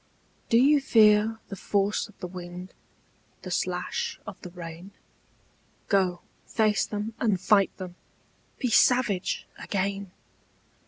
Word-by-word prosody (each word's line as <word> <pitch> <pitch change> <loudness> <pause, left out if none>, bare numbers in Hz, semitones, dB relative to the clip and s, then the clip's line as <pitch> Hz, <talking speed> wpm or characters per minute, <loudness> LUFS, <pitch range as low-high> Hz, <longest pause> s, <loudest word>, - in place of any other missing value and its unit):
DO 230 - +5
you 280 +4 +5
fear 220 -3 +5
the 195 - -5
force 200 +3 0
of 210 - -20
the - - -3
wind, 180 0 -8 0.7
The - - -6
slash - - -2
of - - -9
the 180 - -8
rain? 175 +2 -9 1.0
Go 185 -3 +2 0.3
face 215 -2 +2
them 210 +2 -4
and 210 -6 +1
fight 200 +1 +3
them, 185 -2 -7 0.6
Be 250 -3 -1
savage 235 -7 +3
again. 200 0 -2
200 Hz, 120 wpm, -27 LUFS, 185-220 Hz, 1.0 s, DO